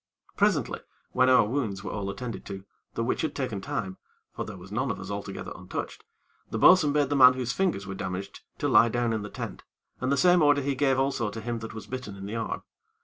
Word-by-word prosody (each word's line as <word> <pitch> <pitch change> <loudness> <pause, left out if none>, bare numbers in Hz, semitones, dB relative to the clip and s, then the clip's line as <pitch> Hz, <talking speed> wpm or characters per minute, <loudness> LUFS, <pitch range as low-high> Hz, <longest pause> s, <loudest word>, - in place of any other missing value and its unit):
Presently, - - +1 0.3
when 130 0 +4
our 125 -4 +6
wounds 105 -5 -2
were 95 - -4
all 100 -1 -3
attended 115 +3 -5
to, 95 -1 -7 0.3
the - - 0
which - - 0
had - - -2
taken - - -3
time, 95 0 -4 0.3
for - - -4
there 105 -2 -8
was 90 +2 -12
none 130 +5 -1
of 110 - -3
us - - -7
altogether 100 -1 -5
untouched, - - -6 0.5
the - - -3
bo'sun 155 +4 +6
bade 145 -2 +2
the 145 - +1
man 130 -2 +8
whose 125 -1 -2
fingers 180 - 0
were 95 - -5
damaged, 95 0 -5 0.2
to - - -1
lie 115 - +6
down 120 0 0
in 110 - -1
the 105 - -6
tent, - - -6 0.4
and 130 +1 -1
the 140 - +2
same 180 +1 +5
order 145 -1 +5
he 140 +1 0
gave 135 0 +2
also 135 -4 0
to 110 +2 -6
him 115 +1 -3
that 115 0 -8
was 110 -2 -7
bitten 125 -3 -6
in 95 0 -8
the 105 +3 -5
arm. 115 -1 -3
115 Hz, 235 wpm, -27 LUFS, 100-135 Hz, 0.5 s, man